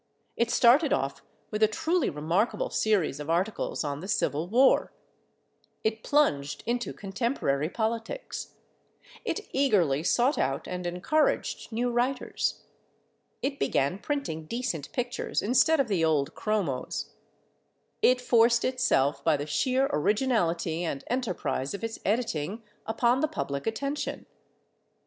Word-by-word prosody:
It 235 Hz, 0 st, +1 dB
started 260 Hz, +6 st, +5 dB
off 135 Hz, +1 st, -1 dB, 0.3 s
with 210 Hz, -, -3 dB
a 215 Hz, -, +7 dB
truly 320 Hz, +8 st, 0 dB
remarkable 180 Hz, -, 0 dB
series 190 Hz, -10 st, +1 dB
of 150 Hz, +1 st, -6 dB
articles 180 Hz, +4 st, -1 dB
on 145 Hz, -1 st, -3 dB
the 185 Hz, -, -7 dB
Civil 160 Hz, -4 st, 0 dB
War; 255 Hz, +7 st, +4 dB, 0.9 s
it 220 Hz, 0 st, 0 dB
plunged 150 Hz, -, +1 dB
into 240 Hz, +1 st, -1 dB
contemporary 195 Hz, -, -1 dB
politics; 230 Hz, -, -4 dB, 0.7 s
it -, -, -1 dB
eagerly 190 Hz, -, +2 dB
sought 245 Hz, -, +2 dB
out 135 Hz, +1 st, -1 dB
and 180 Hz, -1 st, -4 dB
encouraged 210 Hz, -, 0 dB
new 240 Hz, +2 st, 0 dB
writers; 250 Hz, +2 st, -1 dB, 0.8 s
it 280 Hz, 0 st, -2 dB
began 140 Hz, +8 st, +1 dB
printing 220 Hz, -, -3 dB
decent 230 Hz, -, -3 dB
pictures 245 Hz, -1 st, -2 dB
instead 275 Hz, +8 st, +4 dB
of 275 Hz, -, +2 dB
the 190 Hz, -6 st, +1 dB
old 150 Hz, -3 st, +1 dB
chromos; 195 Hz, -12 st, -2 dB, 0.9 s
it 255 Hz, 0 st, +5 dB
forced 235 Hz, -1 st, +4 dB
itself, 250 Hz, -, +1 dB
by 160 Hz, -3 st, +3 dB
the 145 Hz, -, -4 dB
sheer 260 Hz, -, +1 dB
originality 175 Hz, -, +1 dB
and 145 Hz, -5 st, -3 dB
enterprise 195 Hz, -, -2 dB
of 200 Hz, -, -8 dB
its 225 Hz, 0 st, -4 dB
editing, 215 Hz, -2 st, -1 dB, 0.2 s
upon 235 Hz, +3 st, +2 dB
the 310 Hz, -, +2 dB
public 140 Hz, -, -4 dB
attention. 275 Hz, +6 st, -3 dB
220 Hz, 125 wpm, -28 LUFS, 160-250 Hz, 0.9 s, a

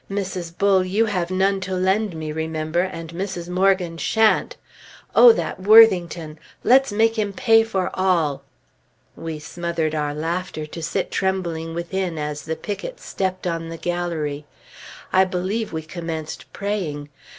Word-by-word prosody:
Mrs. 185 Hz, -4 st, -4 dB
Bull, 195 Hz, -2 st, +4 dB
you 200 Hz, +5 st, +1 dB
have 180 Hz, -5 st, -1 dB
none 195 Hz, +1 st, +1 dB
to 190 Hz, 0 st, -3 dB
lend 190 Hz, +1 st, +1 dB
me, 155 Hz, -1 st, -4 dB
remember, 160 Hz, +1 st, -1 dB
and 165 Hz, -3 st, -5 dB
Mrs. 180 Hz, -1 st, -4 dB
Morgan 180 Hz, -2 st, +1 dB
shan't! 220 Hz, -, +2 dB, 0.6 s
Oh, 485 Hz, -, +9 dB
that -, -, -3 dB
Worthington! 180 Hz, -7 st, +5 dB, 0.2 s
Let's 265 Hz, -1 st, +5 dB
make 225 Hz, +2 st, +2 dB
him 205 Hz, -1 st, 0 dB
pay 225 Hz, +2 st, +5 dB
for 195 Hz, -5 st, -2 dB
all!" 165 Hz, -7 st, +1 dB, 0.7 s
We 165 Hz, -1 st, -5 dB
smothered 165 Hz, +1 st, -3 dB
our 150 Hz, -1 st, -1 dB
laughter 165 Hz, 0 st, -3 dB
to 160 Hz, +2 st, -8 dB
sit 165 Hz, +1 st, -2 dB
trembling 170 Hz, -4 st, -2 dB
within 175 Hz, 0 st, -3 dB
as 150 Hz, -1 st, -4 dB
the 160 Hz, 0 st, -2 dB
pickets 215 Hz, -, -6 dB
stepped 185 Hz, -1 st, -3 dB
on 165 Hz, -1 st, -2 dB
the 165 Hz, -, -6 dB
gallery. 160 Hz, -5 st, -3 dB, 0.7 s
I 190 Hz, -, +6 dB
believe 190 Hz, +4 st, -2 dB
we 160 Hz, -1 st, -4 dB
commenced 160 Hz, -1 st, -6 dB
praying. 175 Hz, -8 st, -3 dB
180 Hz, 145 wpm, -22 LUFS, 160-195 Hz, 0.7 s, Oh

